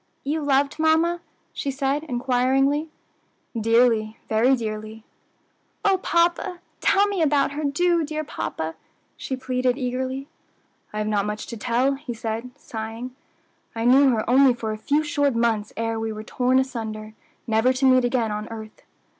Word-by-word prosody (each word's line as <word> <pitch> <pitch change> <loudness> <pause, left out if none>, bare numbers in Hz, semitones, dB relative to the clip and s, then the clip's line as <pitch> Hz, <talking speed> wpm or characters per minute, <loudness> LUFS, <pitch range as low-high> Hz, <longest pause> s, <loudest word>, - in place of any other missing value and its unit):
"You 305 +3 -1
loved 280 +1 +1
mamma?" 325 +2 +3 0.3
she 280 - -3
said 275 +2 -1
inquiringly. 265 +3 +1 0.7
"Dearly, 225 -1 +3
very 235 +5 +4
dearly." 215 -1 -5 0.8
"O 390 -2 +4
papa! 345 +1 +1 0.2
tell 400 +1 +4
me 400 -3 -1
about 290 -3 +3
her! 300 +2 -4
do, 335 +4 +2
dear 310 +1 -3
papa," 160 - -4 0.4
she 265 - -4
pleaded 255 -1 0
eagerly. 260 +1 -3 0.6
"I 210 - -6
have 215 0 -1
not 205 -1 +1
much 210 0 -4
to 235 - -7
tell," 245 +4 +1
he 270 -3 -6
said, 225 +2 -4
sighing. 225 +3 -6 0.6
"I 225 0 -2
knew 270 +3 +6
her 225 -4 0
only 260 +1 +5
for 225 -2 -3
a 215 - -4
few 295 +7 +1
short 285 -3 +1
months 225 -3 +1
ere 225 0 -1
we 225 0 -2
were 215 0 -6
torn 250 +3 +1
asunder, 220 -4 -3 0.3
never 225 +2 +3
to 260 +1 0
meet 255 -1 +5
again 240 -3 +1
on 210 +1 -4
earth." 220 -1 -9
255 Hz, 155 wpm, -24 LUFS, 225-285 Hz, 0.8 s, knew